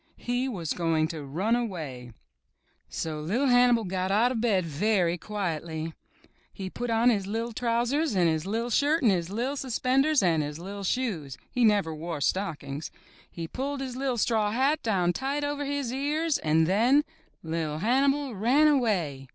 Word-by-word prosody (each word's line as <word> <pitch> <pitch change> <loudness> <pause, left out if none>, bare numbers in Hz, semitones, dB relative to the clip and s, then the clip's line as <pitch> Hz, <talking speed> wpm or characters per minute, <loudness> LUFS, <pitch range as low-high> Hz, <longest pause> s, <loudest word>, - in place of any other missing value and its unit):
He 245 +2 -1
was 175 - -3
going 165 -2 +1
to 160 -3 -6
run 185 +12 0
away! 155 - -4 0.8
So 155 -2 -4
Li'r 225 - 0
Hannibal 245 -2 +5
got 185 -1 -2
out 225 +5 +3
of 230 -4 -2
bed 200 -7 +2
very 175 +2 +1
quietly. 165 -5 -4 0.6
He 190 -1 -7
put 245 0 -4
on 230 +2 +4
his 200 -4 -1
li'r 225 +3 -3
trousers 245 +4 0
and 180 -2 +4
his 160 0 0
IVV 230 +4 -2
shirt 295 +4 +2
and 225 - +5
his 175 -2 -1
IVV 250 +7 -2
suspenders 265 +2 +2
and 165 -4 +3
his 150 0 -4
li'T 195 +3 -6
shoes 175 - -2
— - - -39
he 250 - +1
never 205 -7 +3
wore 160 0 -5
stock 170 +1 -1
ings. 140 +3 -5 0.4
He 165 -1 -6
pulled 275 - -4
his 260 -2 -5
IVV 260 -2 -1
straw 220 -2 +1
hat 270 +7 +1
down 180 -6 +1
tight 275 +8 -2
over 290 0 -2
his 280 -3 -2
ears 300 +3 0
and 160 +1 +2
then 235 - +4 0.2
— - - -39
Li*r 160 -2 -2
Hannibal 270 - +1
ran 250 +9 +3
away! 185 - +1
215 Hz, 175 wpm, -27 LUFS, 165-255 Hz, 0.8 s, Hannibal